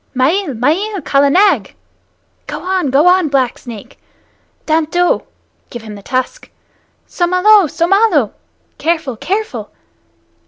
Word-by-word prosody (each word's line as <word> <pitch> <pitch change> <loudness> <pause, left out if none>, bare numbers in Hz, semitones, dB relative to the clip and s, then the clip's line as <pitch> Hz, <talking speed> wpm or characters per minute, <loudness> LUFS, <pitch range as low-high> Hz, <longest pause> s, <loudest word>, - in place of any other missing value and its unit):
"Mael, 290 +4 0
mael, 365 - 0
Kala 280 0 +2
Nag! 390 +7 +2 0.7
(Go - - -6
on, 370 -5 -1
go 275 +5 +3
on, 360 -2 +4
Black 260 -3 0
Snake!) 225 -5 -11 0.7
Dant 315 -1 +1
do! 355 +1 +1 0.5
(Give 240 -2 -8
him 215 -1 -9
the 205 - -10
tusk!) 260 - -4 0.6
Somalo! 365 +2 +3
Somalo! 345 - +2 0.5
(Careful, 315 -6 -1
careful!) 280 - -4
320 Hz, 115 wpm, -15 LUFS, 260-375 Hz, 0.7 s, on